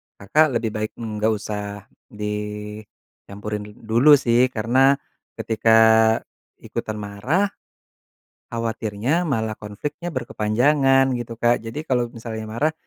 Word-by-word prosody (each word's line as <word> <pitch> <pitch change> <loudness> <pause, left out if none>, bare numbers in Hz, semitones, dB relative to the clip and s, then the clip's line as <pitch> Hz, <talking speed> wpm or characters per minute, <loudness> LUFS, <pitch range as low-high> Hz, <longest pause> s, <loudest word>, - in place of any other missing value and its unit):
Kakak 155 +11 +3
lebih 115 -1 -1
baik 110 0 -3
nggak 110 -2 -2
usah 105 -1 -4 0.2
dicampurin 105 -1 -6
dul 105 - -14
dulu 120 +7 +5
sih, 125 -1 +3
karena 130 +4 +3 0.4
ketika 110 0 +2 0.9
ikutan 110 - -4
marah, 105 - -1 1.0
khawatirnya 115 +5 -1
malah 110 -5 -1
konfliknya 115 +12 -6
berkepanjangan, 135 +2 +2
gitu, 120 -2 -5
Kak. 120 -1 +2
Jadi 145 +8 -6
kalau 120 -2 0
misalnya 110 -2 -7
marah, 145 +8 0
115 Hz, 105 wpm, -22 LUFS, 105-130 Hz, 1.0 s, dulu